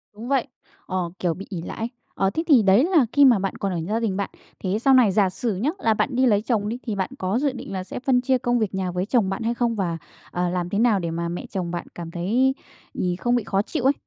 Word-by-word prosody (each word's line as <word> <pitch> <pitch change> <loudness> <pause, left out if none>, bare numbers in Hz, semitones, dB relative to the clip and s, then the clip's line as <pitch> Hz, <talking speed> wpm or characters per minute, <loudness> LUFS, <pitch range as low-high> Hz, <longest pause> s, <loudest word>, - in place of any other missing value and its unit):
Đúng 225 +3 -8
vậy, 270 -1 +1 0.4
ờ, 185 -2 -2
kiểu, 175 -2 +1
bị 195 +5 -8
ỷ 180 -5 -4
lại - - -7
ấy. 225 +1 -2 0.3
Ờ, 195 - +2
thế 320 +11 -2
thì 280 -8 +7
đấy 195 +5 +5
là 330 -6 +4
khi 285 -1 +6
mà 240 -7 +6
bạn 195 0 -2
còn 195 -1 -2
ở 175 - -2
gia 220 +3 0
đình 210 -5 -1
bạn. 200 - -2 0.3
Thế 195 +2 0
sau 270 +3 +4
này 250 -6 +6
giả 195 -1 +3
sử 215 +3 -2
nhá, 225 +11 0
là 225 -10 +3
bạn 245 +4 -1
đi 260 +1 +3
lấy 205 -4 +4
chồng 215 -2 0
đi, 235 - -3
thì 215 - -1
bạn 190 -1 -1
có 190 +5 0
dự 285 0 +1
định 250 -6 -8
là 185 -1 -3
sẽ 185 - -6
phân 250 -1 +2
chia 260 +1 +2
công 245 -1 0
việc 210 -3 -1
nhà 185 -1 -1
với 180 +1 -1
chồng 220 -3 +2
bạn 195 +4 -3
hay 230 +1 0
không? 235 -1 0
Và, 175 -5 -1 0.3
à, 180 0 0
làm 175 0 -2
thế 200 - -1
nào 225 -4 +4
để 170 -2 -3
mà 170 +1 -2
mẹ 175 - -5
chồng 180 -4 -4
bạn 175 -1 -4
cảm 170 -1 -7
thấy, 235 +11 +1 0.4
ì, 180 -1 -1
không 240 +6 0
bị 240 - +1
khó 195 0 +1
chịu 265 +6 -4
ấy? 270 +2 +5
210 Hz, 290 wpm, -23 LUFS, 185-245 Hz, 0.4 s, thì